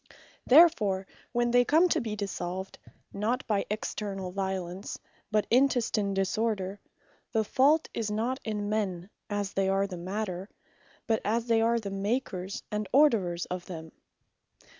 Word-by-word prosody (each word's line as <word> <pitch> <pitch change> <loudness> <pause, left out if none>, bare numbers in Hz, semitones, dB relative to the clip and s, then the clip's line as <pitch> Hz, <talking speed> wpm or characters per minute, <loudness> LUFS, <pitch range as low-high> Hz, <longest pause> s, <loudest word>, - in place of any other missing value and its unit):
Therefore 240 - +6 0.3
when 240 0 +1
they 245 0 +6
come 320 +8 +4
to - - +2
be 220 -2 -3
dissolved, 190 -2 -4 0.3
not 225 +6 -1
by 205 -3 0
externall 200 -3 -4
violence, 190 -1 -3 0.3
but 215 -1 +2
intestine 235 -6 +2
disorder, 195 0 -1 0.5
the 220 -1 +3
fault 285 +8 +3
is 220 -2 -2
not 230 +5 -1
in 210 -2 -3
men, 200 -3 -2 0.2
as 205 -1 -2
they 195 0 +1
are 195 +1 +2
the 185 -3 -6
Matter; 190 +1 -4 0.6
but 225 -2 +1
as 225 +2 0
they 230 -1 +3
are 230 +1 +3
the 200 -3 -5
Makers, 195 -1 -2
and 210 -1 -2
orderers 210 - +3
of 180 -1 -4
them. 160 -3 -7
210 Hz, 140 wpm, -29 LUFS, 190-230 Hz, 0.6 s, Therefore